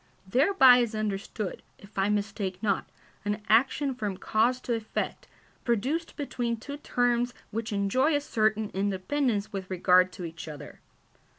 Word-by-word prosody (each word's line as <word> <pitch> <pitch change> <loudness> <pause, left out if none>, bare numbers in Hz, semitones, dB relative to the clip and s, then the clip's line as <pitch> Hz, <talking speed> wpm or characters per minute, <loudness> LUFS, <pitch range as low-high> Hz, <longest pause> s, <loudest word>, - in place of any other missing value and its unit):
Thereby 260 - +6
is 235 -2 0
understood, 210 -1 -3 0.2
if 200 +2 -17
I 195 +1 +1
mistake 205 -2 -1
not, 200 -3 0 0.3
an 205 +1 -1
action 265 +5 +3
from 210 -6 -3
cause 235 +6 +1
to 240 - -2
effect, 225 -1 -3 0.4
produced 265 +9 -1
between 240 -5 -2
two 285 +6 -7
terms 245 -3 0 0.2
which 225 +1 -3
enjoy 235 +10 +2
a 290 - +1
certain 215 -5 0
independence 205 +4 -1
with 190 -2 -5
regard 185 0 +4
to 180 - -6
each 165 0 -8
other. 150 -2 -9
215 Hz, 140 wpm, -28 LUFS, 195-245 Hz, 0.4 s, Thereby